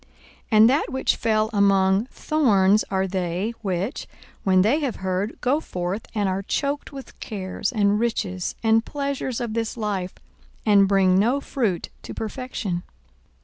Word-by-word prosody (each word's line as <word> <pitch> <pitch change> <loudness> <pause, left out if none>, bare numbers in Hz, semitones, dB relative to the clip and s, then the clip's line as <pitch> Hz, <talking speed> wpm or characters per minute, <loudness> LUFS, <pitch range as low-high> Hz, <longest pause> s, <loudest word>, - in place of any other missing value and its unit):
42:008:014 - - -30 0.4
And 215 +2 +7
that 285 - +2
which 265 - +1
fell 215 -1 +1
among 195 0 +3
thorns 215 -11 +2
are 190 0 0
they, 185 +3 -2
which, 195 - -3 0.4
when 185 -1 +4
they 245 +9 +3
have 275 -6 -2
heard, 190 +3 -3
go 270 +4 +2
forth, 185 - -4
and 205 -2 +1
are 190 +1 -1
choked 280 +9 -2
with 275 -2 -11
cares 200 +1 -4
and 205 -3 +2
riches 190 -6 -2
and 225 0 +4
pleasures 280 -3 -3
of 235 -3 -3
this 230 +1 -2
life, 200 -4 -3 0.5
and 200 -2 +5
bring 190 -1 +4
no 240 +7 +2
fruit 230 - -2
to - - -8
perfection. 220 -5 -4
210 Hz, 150 wpm, -23 LUFS, 190-240 Hz, 0.5 s, And